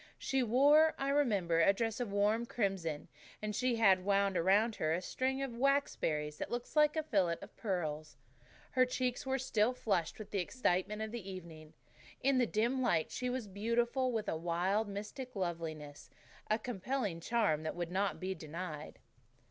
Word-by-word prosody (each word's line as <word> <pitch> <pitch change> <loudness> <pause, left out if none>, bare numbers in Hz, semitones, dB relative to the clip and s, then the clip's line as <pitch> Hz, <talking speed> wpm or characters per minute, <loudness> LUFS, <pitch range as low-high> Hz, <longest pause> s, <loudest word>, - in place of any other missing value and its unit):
She 270 -1 0
wore, 285 +7 +5
I 275 - -1
remember, 205 - +2
a 195 - +5
dress 225 +2 -2
of 240 -5 -3
warm 210 +4 +1
crimson, 190 -10 -2 0.3
and 210 -1 -3
she 250 +1 +1
had 195 -5 +4
wound 200 0 +2
around 200 +6 +3
her 155 0 +1
head - - +1
a - - -4
string 265 +1 -1
of 270 - -3
waxberries, 170 - 0
that - - -3
looked 240 +4 -5
like 300 0 +5
a 315 - 0
fillet 185 - +1
of 200 - -12
pearls. 155 - -3 0.5
Her 255 -2 +4
cheeks 250 0 -1
were 265 0 +1
still 245 -2 +1
flushed 185 -9 -1
with 215 -1 -9
the 200 - 0
excitement 210 0 0
of 220 - -5
the 225 -5 -6
evening. 165 -4 -9 0.5
In 270 -1 +3
the 245 - +3
dim 235 +5 +1
light 235 -10 +1
she 250 0 -2
was 250 -2 -2
beautiful, 235 +6 0
with 220 -3 -2
a - - 0
wild, 175 +6 0
mystic 215 +6 -6
loveliness, 165 -5 -4 0.4
a 215 - +3
compelling 220 -3 -3
charm 205 -5 +1
that 155 - -4
would 175 -1 -4
not 195 +2 0
be 190 +1 -2
denied. 155 -1 -7
210 Hz, 180 wpm, -34 LUFS, 175-250 Hz, 0.5 s, wore